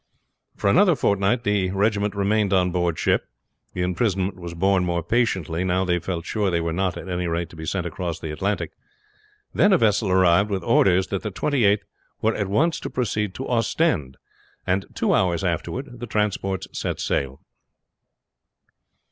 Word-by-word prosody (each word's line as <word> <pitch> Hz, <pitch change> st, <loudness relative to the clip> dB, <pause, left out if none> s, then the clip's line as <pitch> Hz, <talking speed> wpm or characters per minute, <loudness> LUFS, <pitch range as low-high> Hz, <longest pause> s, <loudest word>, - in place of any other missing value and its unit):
For -, -, -2 dB
another 180 Hz, -, +5 dB
fortnight 100 Hz, +2 st, +1 dB
the 100 Hz, -2 st, +1 dB
regiment 100 Hz, +1 st, 0 dB
remained 100 Hz, 0 st, +1 dB
on 90 Hz, -1 st, +3 dB
board 85 Hz, -2 st, 0 dB
ship. -, -, +1 dB, 0.5 s
The 90 Hz, -, -2 dB
imprisonment 95 Hz, 0 st, 0 dB
was 85 Hz, -2 st, -8 dB
borne 95 Hz, +1 st, +2 dB
more 85 Hz, -1 st, -1 dB
patiently, 95 Hz, -5 st, 0 dB
now 95 Hz, +1 st, +1 dB
they 90 Hz, -1 st, +1 dB
felt 85 Hz, -1 st, -4 dB
sure 105 Hz, +2 st, -1 dB
that 90 Hz, -3 st, +1 dB
they -, -, +2 dB
were 85 Hz, -1 st, -2 dB
not 95 Hz, 0 st, -1 dB
at -, -, -8 dB
any 90 Hz, -1 st, -2 dB
rate 85 Hz, 0 st, -2 dB
to -, -, -13 dB
be 80 Hz, 0 st, -7 dB
sent 95 Hz, 0 st, -1 dB
across 85 Hz, -1 st, -4 dB
the 80 Hz, -, -5 dB
Atlantic. 100 Hz, +7 st, -2 dB, 0.8 s
Then 205 Hz, -, +4 dB
a 190 Hz, -, +6 dB
vessel 105 Hz, -, +2 dB
arrived 95 Hz, +2 st, +4 dB
with 95 Hz, -3 st, -2 dB
orders 95 Hz, +1 st, +3 dB
that 100 Hz, -, -2 dB
the 105 Hz, -, -3 dB
Twenty 130 Hz, +4 st, 0 dB
eighth 100 Hz, +1 st, +3 dB, 0.3 s
were 110 Hz, +1 st, +1 dB
at 105 Hz, -3 st, -2 dB
once 155 Hz, -, +1 dB
to -, -, -5 dB
proceed 105 Hz, -5 st, -2 dB
to 135 Hz, -, -5 dB
Ostend, 115 Hz, -, 0 dB, 0.5 s
and 95 Hz, +1 st, 0 dB
two -, -, +1 dB
hours 90 Hz, -1 st, +1 dB
afterward 120 Hz, -, -3 dB
the 120 Hz, -, -6 dB
transports 100 Hz, -3 st, -1 dB
set -, -, -3 dB
sail. 70 Hz, -1 st, -2 dB
95 Hz, 180 wpm, -23 LUFS, 90-105 Hz, 0.8 s, a